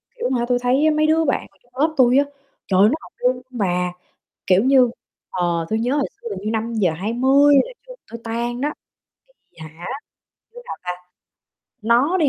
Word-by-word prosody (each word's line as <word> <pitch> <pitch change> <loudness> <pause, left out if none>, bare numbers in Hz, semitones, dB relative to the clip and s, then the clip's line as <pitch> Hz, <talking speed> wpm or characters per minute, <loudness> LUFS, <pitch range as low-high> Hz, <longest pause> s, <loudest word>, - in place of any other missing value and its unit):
kiểu, 475 - -3
hả 240 - 0
tui 245 - +2
thấy 255 +4 +2
á - - +5
mấy 310 - +3
đứa 320 +1 +3
bạn 275 - 0
ngồi - - -31
trong 245 - -32
lớp 315 +1 +2
tui 255 0 +5
á, 285 - +4 0.4
trời 190 -1 +2
ơi 205 - +7
nó 260 - +1
học - - -14
luôn 250 0 0
bà, 180 -7 -1 0.5
kiểu 190 +3 +4
như, 260 -2 +5 0.4
ờ, 170 -2 -1
tui 220 - +1
nhớ 245 +5 0
hồi 280 - +1
xưa - - -6
hình 195 - -4
như 215 - -1
5:20 230 - +2
là - - -10
trường - - -11
tui 230 - -7
tan 235 +2 -3
đó, 295 +2 -1 0.8
thì - - -32
hả, 160 +2 -10 0.7
đứa 485 - -10
nào - - -5 0.2
ta, 180 - -17 0.8
nó 245 - +3
đi 310 -4 +3
245 Hz, 200 wpm, -21 LUFS, 210-280 Hz, 0.8 s, ơi